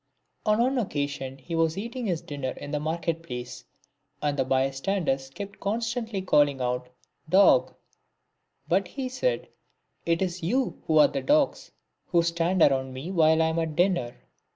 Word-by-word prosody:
On 215 0 +4
one 255 +3 +2
occasion 140 - -3
he 140 +6 -9
was 165 +1 +1
eating 235 +3 -4
his 175 -3 -1
dinner 145 -5 -4
in 145 - -8
the 150 - -1
market 165 +1 -2
place, 125 -5 -7 0.6
and 145 -1 0
the 135 - +1
bystanders 135 +2 0
kept 200 +8 -8
constantly 225 -1 -2
calling 145 -6 +3
out 125 0 -2 0.2
" - - -28
Dog 130 -10 +5 0.5
;" - - -49
but 190 +2 +2
he 270 -2 -4
said, - - -1 0.3
" - - -47
It 170 +2 +2
is 180 -1 -3
you 250 +10 -1
who 155 - +3
are 150 -1 +8
the 135 - -3
dogs, 290 - +1 0.4
who 170 -2 +3
stand 170 +1 +2
around 130 -1 +2
me 135 +8 -6
while 160 -2 +4
I 160 - +2
am 160 +1 -1
at 160 -2 -2
dinner." 175 -9 +1
165 Hz, 175 wpm, -26 LUFS, 135-195 Hz, 0.6 s, are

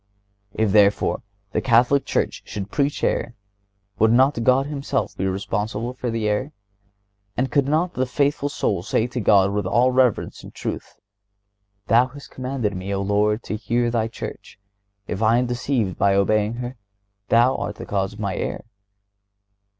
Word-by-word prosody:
If, 110 -2 +1
therefore, 105 0 +3 0.3
the - - 0
Catholic 125 +3 +3
Church - - -1
could 100 0 -5
preach 145 0 0
error, 120 - 0 0.6
would 110 +1 +5
not 130 0 +3
God 130 +3 +4
Himself 140 -2 -2
be 95 - -1
responsible 105 +5 -2
for 125 -1 -4
the 115 -2 -1
error? 115 +8 -1 0.8
And 130 +2 0
could 140 -2 +2
not 160 +5 +1
the 130 0 -1
faithful 145 +2 0
soul 100 -9 -1
say 110 +4 0
to 125 +1 -4
God 100 -3 +4
with 100 -2 -1
all 120 +6 +3
reverence 125 -4 +1
and - - -11
truth: - - -5 0.9
Thou 120 +4 +4
hast 140 +2 -13
commanded 130 -6 -3
me, 95 +2 -5
O 100 - -1
Lord, 105 +2 +1
to - - -4
hear 120 +3 0
Thy 115 -2 0
Church; 115 - -8 0.5
if 95 - -4
I 115 +1 +4
am 125 - +2
deceived 120 -5 -1
by 100 -1 +3
obeying 105 +2 +2
her, 125 +1 -6 0.5
Thou 120 +3 +4
art 105 - -4
the - - -8
cause 95 -1 -1
of 105 - -13
my 100 -3 -2
error? - - -4
115 Hz, 165 wpm, -22 LUFS, 105-130 Hz, 0.9 s, would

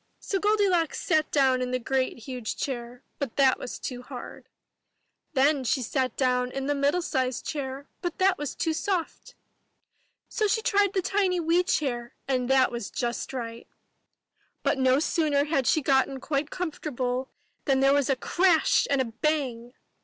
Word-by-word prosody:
So 390 - -2
Goldilocks 395 -5 +2
sat 310 -2 +1
down 265 -3 +3
in 250 - -1
the 255 - 0
great 255 +1 -1
huge 245 -2 -5
chair, 245 -1 -5 0.2
but 275 -5 -3
that 270 -2 +4
was - - -6
too 250 -2 -6
hard. 250 0 -10 0.8
Then 280 0 +3
she 260 +1 0
sat 255 0 -1
down 250 -1 +1
in 270 +1 -4
the 290 - +1
middle 285 +5 +1
sized 255 -5 -1
chair, 275 -1 -4
but 350 -2 -3
that 375 -1 +3
was 295 -3 -4
too 325 - 0
soft. 370 +8 -3 0.9
So 430 - 0
she 440 +2 0
tried 405 -2 +2
the 380 -3 0
tiny 380 -2 +1
wee 335 +2 +3
chair, 245 -9 -2
and 255 -2 0
that 265 -1 +4
was 235 -4 -5
just 240 -1 -3
right. 235 -3 -6 1.0
But 270 - +1
no 260 0 +4
sooner 300 -2 +1
had 280 -4 0
she 310 - +3
got 265 -1 +3
quite 285 +1 -2
comfortable 265 -7 -3 0.4
than 270 -2 +3
there 275 +1 +5
was 285 -1 +2
a 270 - +3
crash 345 +5 +3
and 280 -1 +2
a - - 0
bang 245 -1 -2
275 Hz, 170 wpm, -27 LUFS, 255-320 Hz, 1.0 s, there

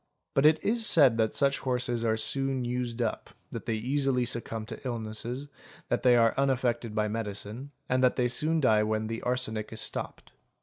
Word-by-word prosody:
_ - - -49 0.3
But 140 +2 +5
it 155 0 +5
is 230 +2 +1
said 135 -8 +5
that 110 -1 +1
such 140 -1 +2
horses 125 -2 -1
are 110 -1 +1
soon 135 +3 0
used 120 -1 -2
up, 110 - -3 0.2
that - - -7
they 115 - 0
easily 130 +2 0
succumb 115 -2 -3
to 115 - -8
illnesses, 120 +2 -4 0.4
that - - 0
they 125 -1 +5
are 115 -1 +4
unaffected 120 -4 0
by 105 -1 +1
medicine, 105 +4 -4 0.2
and 130 0 +1
that 125 - +4
they 125 -1 +2
soon 155 +6 +1
die 110 -5 +4
when 110 0 -1
the 115 +1 -4
arsenic 110 -4 -2
is 110 - -6
stopped. - - -6
120 Hz, 190 wpm, -28 LUFS, 110-130 Hz, 0.4 s, But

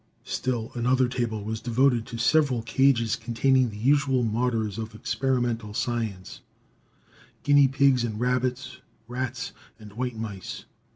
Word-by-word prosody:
Still 120 -3 -2
another 125 +1 +2
table 120 -4 -2
was 110 +1 -4
devoted 120 -1 +2
to 115 - -6
several 130 -2 +2
cages, 115 -1 +2
containing 125 +2 +2
the 105 - -9
usual 135 +1 +2
martyrs 115 -2 -1
of 110 0 -6
experimental 120 -3 -1
science: 110 -7 -3 1.0
guinea 145 -1 +6
pigs 135 -2 +3
and 110 -3 -3
rabbits, 125 +1 -1 0.3
rats 125 0 -4 0.3
and 105 -2 -13
white 125 +1 -3
mice. 100 -4 -6
120 Hz, 125 wpm, -26 LUFS, 110-130 Hz, 1.0 s, guinea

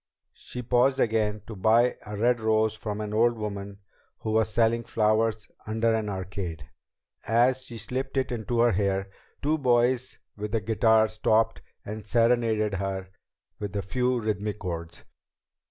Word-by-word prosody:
She 125 - -8
paused 125 +2 +3
again 110 -2 +1
to 110 - -8
buy 115 +5 +3
a 105 0 -5
red 120 +2 +2
rose 110 0 +2
from 105 -1 -5
an 105 0 -4
old 115 +2 +3
woman 100 -1 -6 0.4
who 110 - -2
was 110 0 +2
selling 115 +1 +2
flowers 110 -1 +1 0.2
under 115 +1 +1
an 110 -2 -1
arcade. 95 -6 -5 0.6
As 120 +4 +3
she 120 -2 -9
slipped 130 +5 -4
it 130 - 0
into 115 0 -1
her 120 0 +5
hair, 95 0 0 0.3
two 155 +2 +1
boys 125 0 +2 0.2
with 105 +1 -4
a - - +2
guitar 110 +1 +3
stopped 110 +1 +1 0.2
and 105 +1 -6
serenaded 115 -1 +2
her 95 -1 -3 0.5
with 105 -1 -5
a 100 - -1
few 125 +5 0
rhythmic 105 -1 -2
chords. 85 -4 -6
110 Hz, 155 wpm, -27 LUFS, 105-120 Hz, 0.6 s, her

